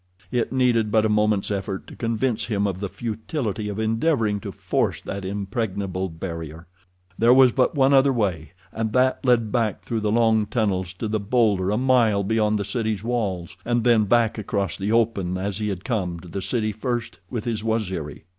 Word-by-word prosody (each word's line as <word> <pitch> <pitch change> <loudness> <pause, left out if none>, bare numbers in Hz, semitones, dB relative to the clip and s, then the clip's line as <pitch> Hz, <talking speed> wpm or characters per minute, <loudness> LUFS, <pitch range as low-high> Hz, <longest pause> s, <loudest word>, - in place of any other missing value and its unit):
It 120 -2 0
needed 125 -4 +2
but 110 0 +3
a - - +2
moment's 105 -1 +1
effort 95 -1 -3
to - - -12
convince 115 0 -1
him 105 -3 0
of 95 -2 -2
the 100 -1 -3
futility 110 - -3
of 100 - -5
endeavoring 110 -1 +1
to - - -6
force - - -1
that 100 0 -5
impregnable 95 -1 -3
barrier. 80 -1 -7 0.5
There 120 +2 +6
was 130 -2 +7
but 130 +5 +1
one 135 0 +4
other 135 0 +5
way, 90 - -1 0.2
and 110 -1 -3
that 130 0 +2
led 120 -4 +2
back 115 -5 0
through 115 - -2
the 105 -1 0
long 110 -2 +3
tunnels 95 -6 -1
to 110 +4 -4
the 110 0 -1
bowlder 100 -3 +2
a 105 - +1
mile 120 -5 +3
beyond 110 +1 +1
the 100 - -3
city's 110 -5 -2
walls, 100 -8 -2
and 120 -1 0
then 115 -3 +4
back 115 +1 +2
across 100 -3 -2
the 100 +2 -2
open 105 -6 +1
as 100 +1 -3
he 105 -1 -1
had 95 -2 -5
come 90 -8 -2
to 90 - -12
the 95 +3 -5
city 110 0 -1
first 115 +2 -4
with 115 -4 -4
his 110 -3 -2
Waziri. 95 -11 -2
110 Hz, 195 wpm, -23 LUFS, 100-115 Hz, 0.5 s, was